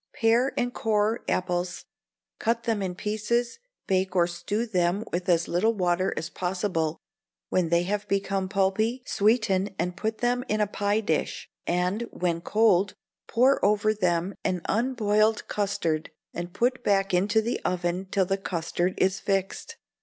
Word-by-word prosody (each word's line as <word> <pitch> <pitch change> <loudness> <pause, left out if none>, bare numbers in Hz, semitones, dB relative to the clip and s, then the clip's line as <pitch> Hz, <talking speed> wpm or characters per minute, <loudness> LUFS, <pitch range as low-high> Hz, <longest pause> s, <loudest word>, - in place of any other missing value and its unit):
Pare 235 +4 +3
and 245 0 0
core 215 +1 +1
apples; 180 0 -1 0.5
cut 230 0 0
them 225 -3 0
in 185 -2 -3
pieces; 220 - -1 0.3
bake 190 0 0
or 175 -2 +5
stew 175 +6 -2
them 185 0 0
with 180 +2 -2
as 170 -1 +3
little 220 +6 +1
water 180 -1 +1
as 155 - -2
possible; 180 -3 -2 0.5
when 180 -3 +1
they 170 +1 +3
have 205 +3 -2
become 195 -1 -1
pulpy, 215 +5 +1
sweeten 205 -3 +1
and 180 0 -2
put 220 +2 -2
them 245 +1 0
in 215 - 0
a 210 - +3
pie 205 +1 0
dish, 160 -7 -2 0.2
and, 180 +6 0
when 170 -2 -1
cold, 205 -1 +3 0.3
pour 255 +4 +3
over 210 +1 +3
them 180 -2 0
an 180 -2 0
unboiled 220 -2 +1
custard, 180 -6 -1 0.2
and 175 +1 -5
put 250 +6 0
back 195 -2 +2
into 205 +5 +3
the 230 +2 -1
oven 180 +1 -1
till 195 -1 +2
the 195 +2 -1
custard 175 0 -2
is 190 +1 +2
fixed. 195 -1 -2
195 Hz, 155 wpm, -26 LUFS, 180-220 Hz, 0.5 s, or